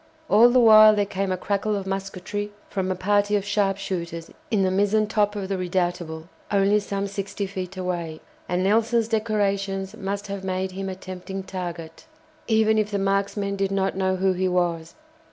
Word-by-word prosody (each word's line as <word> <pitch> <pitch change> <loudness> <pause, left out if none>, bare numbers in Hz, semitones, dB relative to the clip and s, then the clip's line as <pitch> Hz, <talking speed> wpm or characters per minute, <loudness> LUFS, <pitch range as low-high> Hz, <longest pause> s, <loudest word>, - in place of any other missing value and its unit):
All 225 +4 +7
the 250 +1 +4
while 215 -2 +8
there 205 -1 +1
came 195 -1 -2
a 185 - 0
crackle 205 +3 -1
of 195 -1 -3
musketry 195 +1 -4 0.2
from 190 -2 -1
a 185 - 0
party 205 +2 +1
of 200 -1 0
sharpshooters 195 -5 -2 0.2
in 210 -5 +2
the 185 - +2
mizen 205 +3 +2
top 210 -1 +1
of 200 -2 -3
the 195 -1 -2
"Redoutable," 175 -3 -2 0.2
only 200 +1 +3
some 200 -1 -3
sixty 200 0 -4
feet 190 -1 -6
away, 170 -4 -3 0.3
and 180 +1 0
Nelson's 225 +3 +2
decorations 200 -3 -1
must 200 -1 -4
have 200 -1 -5
made 190 0 -2
him 190 +1 -4
a 190 - -5
tempting 185 +1 -7
target, 175 - -7 0.4
even 220 -1 +3
if 210 -1 0
the 205 - -1
marksmen 200 +1 0
did 195 0 0
not 195 -1 0
know 190 0 +1
who 190 0 +1
he 185 +1 0
was. 170 -2 -1
195 Hz, 180 wpm, -24 LUFS, 185-205 Hz, 0.4 s, while